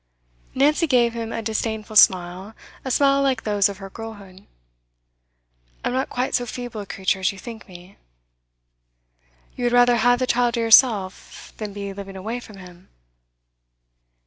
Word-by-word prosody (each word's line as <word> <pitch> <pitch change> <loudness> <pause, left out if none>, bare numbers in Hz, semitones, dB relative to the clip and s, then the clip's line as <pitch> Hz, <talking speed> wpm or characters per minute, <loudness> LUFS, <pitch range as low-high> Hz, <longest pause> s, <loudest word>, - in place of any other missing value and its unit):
Nancy 300 +5 +2
gave 240 -4 +2
him 230 -1 -5
a 225 - -4
disdainful 220 -1 -3
smile, 185 +2 +3 0.3
a 265 - -4
smile 275 +2 +3
like 270 -2 0
those 205 -2 +2
of 200 - -7
her 195 0 -9
girlhood. 205 -4 -11 1.4
'I'm - - -1
not 260 +1 -1
quite 250 +1 -2
so 245 - 0
feeble 245 -2 -6
a 200 - -10
creature 190 0 -1
as 185 - +1
you 195 - -13
think 225 +2 -10
me.' 180 +1 -14 1.6
'You 245 - -3
would 240 - +1
rather 245 0 +5
have 245 +2 +3
the 255 - -1
child 240 -1 +1
to - - -2
yourself, 225 -4 +2
than 215 -2 -6
be 200 0 -6
living 195 0 -9
away 220 +6 -5
from 215 -4 -13
him? 180 -1 -15
220 Hz, 160 wpm, -22 LUFS, 195-245 Hz, 1.6 s, rather